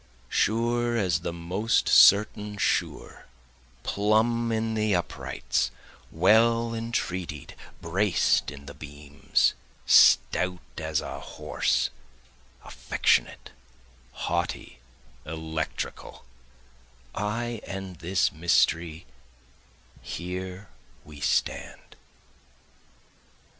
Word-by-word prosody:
Sure 120 +2 +1
as 90 -6 +1
the 85 - -4
most 90 +7 0
certain 105 0 +5
sure, - - -2 0.6
plumb 115 +3 +1
in 110 0 -1
the 105 -2 +1
uprights, - - -2 0.4
well 115 +6 +3
entretied, 95 - -4 0.3
braced 95 +3 +1
in 70 0 -11
the - - -9
beams, 75 -1 -1 0.3
Stout 90 0 +5 0.2
as 80 -1 -1
a - - -6
horse, - - -1 0.7
affectionate, - - 0 0.7
haughty, 85 -7 -3 0.4
electrical, 80 0 -5 0.9
I 115 +3 -3
and 95 -2 -6
this 90 +5 0
mystery 85 -1 +1 1.0
here 90 +2 -6 0.4
we 75 -1 -12
stand. - - -2
95 Hz, 75 wpm, -26 LUFS, 80-110 Hz, 1.0 s, certain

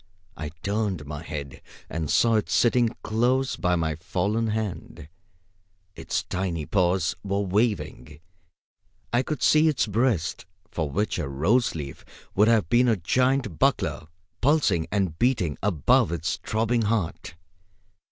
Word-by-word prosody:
I 75 - -5
turned 100 -6 -1
my 75 +1 -6
head 70 -4 -7 0.3
and 80 -3 -4
saw 115 -1 +3
it 105 - -2
sitting 120 -1 +3
close 125 +4 +1
by 90 -1 +1
my 80 -2 0
fallen 100 +6 -1
hand. 105 -7 -4 0.9
Its - - -2
tiny 90 -4 -3
paws 90 -2 +1
were 100 0 -1
waving. 95 - -1 0.9
I 120 - +4
could 150 +3 -4
see 155 +1 +5
its 150 -4 +2
breast, 105 -6 0 0.2
for 80 -3 -2
which 105 +5 -1
a 75 -5 -3
rose 95 - +1
leaf 70 -4 -7 0.3
would 105 +2 +4
have 110 -7 +3
been 120 +6 +4
a 115 -3 +3
giant 125 - 0
buckler, 75 - +1 0.3
pulsing 125 - +2
and 95 -5 -1
beating 115 - +1
above 85 -5 +2
its 85 -1 -2
throbbing 115 +2 0
heart. 105 -7 -2
100 Hz, 135 wpm, -25 LUFS, 80-115 Hz, 0.9 s, see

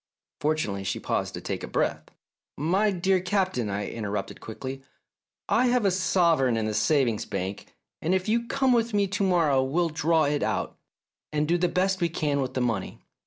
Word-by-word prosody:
Fortunately 145 -11 -1
she 95 - -2
paused - - -2
to - - -6
take - - -5
breath. - - 0 0.4
" - - -66
My 185 +9 +2
dear 190 0 +2
Captain," 185 - 0
I 100 +1 -2
interrupted 105 -3 -4
quickly, 130 +4 -6 0.7
I 250 +2 +3
have 245 -3 +2
a 195 - +4
sovereign 170 -9 +2
in 110 - 0
the 110 - -1
savings 115 0 +2
bank, 100 +1 -5 0.3
and 175 +4 +1
if 185 +1 -1
you 235 +2 +1
come 265 -1 +2
with 230 -2 +1
me 200 -1 +3
to 200 +1 -1
morrow 165 -8 +3
we'll 165 +6 +1
draw 160 +1 +2
it 145 0 0
out, - - -1 0.6
and 150 0 0
do 170 - +3
the 180 - +3
best 185 +1 0
we 170 - +2
can 145 -3 0
with 130 -1 -4
the 130 - 0
money. 115 -6 -2
160 Hz, 190 wpm, -26 LUFS, 125-190 Hz, 0.7 s, a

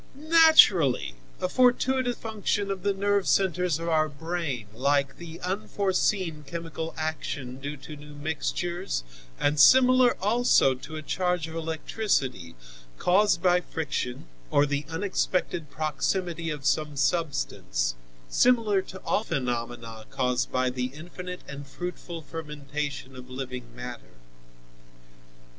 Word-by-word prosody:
"Naturally! 300 - +6 0.3
A - - 0
fortuitous 250 +2 +2
function 205 -2 -1
of 190 -1 -4
the 200 - +1
nerve 200 0 +1
centres 180 -4 +2
of 165 +1 -5
our 155 -2 +2
brain, 150 -5 -3
like 140 +3 +1
the 170 -1 -9
unforeseen 190 -3 0
chemical 165 -1 -5
action 145 -5 -4
due 145 +2 -5
to 150 +2 -9
new 150 0 -12
mixtures 155 - -2 0.4
and 145 +1 +1
similar 255 - +7
also 210 - +4
to 145 +5 -9
a 155 - -5
charge 180 +1 0
of 160 - -9
electricity, 160 - -2 0.4
caused 190 -1 +3
by 180 -1 +4
friction 150 -7 -3 0.2
or 145 - +4
the 145 0 -2
unexpected 175 -3 -1
proximity 165 +2 -1
of 150 -3 -5
some 150 -2 +1
substance, - - 0 0.3
similar 225 - +3
to 190 0 -10
all 210 - +1
phenomena 120 - -3
caused 125 -1 0
by 130 0 +1
the 125 0 -2
infinite 180 +6 -8
and 140 0 -8
fruitful 175 +1 -6
fermentation 150 -3 -5
of 125 0 -10
living 130 -1 -5
matter. 125 - -8
160 Hz, 120 wpm, -27 LUFS, 140-185 Hz, 0.4 s, similar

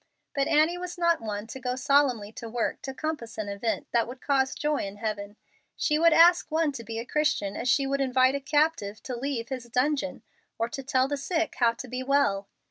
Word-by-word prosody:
But 275 -1 +1
Annie 315 +4 +3
was 360 0 -6
not 340 -3 +2
one 210 -1 -4
to 235 +4 -8
go 250 0 -2
solemnly 265 -6 +2
to 230 +1 -8
work 235 +1 -2
to 275 - -5
compass 265 -5 -5
an 215 -2 -3
event 200 +3 -2
that 235 -1 +2
would 250 +2 -8
cause 270 -1 +1
joy 300 0 0
in 195 0 -4
heaven. 205 -1 -4 0.4
She 300 0 +1
would 335 +1 +6
ask 345 +2 +6
one 315 -1 +1
to 240 -4 -7
be 225 0 -6
a 230 - -4
Christian 265 -9 0
as 250 - -2
she 275 +2 +3
would 275 +1 0
invite 260 0 +3
a 280 - -1
captive 285 -7 0
to 255 - -4
leave 240 -2 -3
his 255 -3 -5
dungeon, 275 +4 -1 0.3
or 230 +1 -1
tell 260 0 0
the 285 +1 -2
sick 325 +3 -1
how 235 -2 +4
to 245 +2 -8
be 250 +1 -4
well. 260 -8 +1
265 Hz, 215 wpm, -27 LUFS, 230-295 Hz, 0.4 s, would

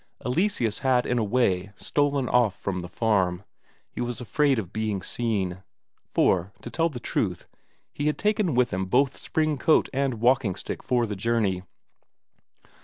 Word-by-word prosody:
Eleseus 125 - 0
had 130 -2 +2
in 125 - +1
a - - +1
way 100 -4 +1
stolen 140 +2 0
off 120 -5 +2
from 95 -2 -2
the 90 0 -7
farm; 95 -2 +1 0.5
he - - -5
was 120 -1 -3
afraid 135 +3 +2
of 95 -5 -4
being 105 -3 -2
seen. 95 -6 -2 0.5
For, 90 +1 +2
to - - -7
tell 165 0 +1
the 130 -6 -7
truth, 90 -6 -2 0.5
he 145 - -2
had 150 - +1
taken 210 - +1
with 125 -4 +2
him 95 +1 -1
both 130 +6 +2
spring 155 -3 -1
coat 155 - +3
and 135 -2 0
walking 120 -3 +2
stick - - -6
for 125 -2 +1
the 105 -2 -4
journey. 100 -3 0
120 Hz, 165 wpm, -26 LUFS, 100-135 Hz, 0.5 s, coat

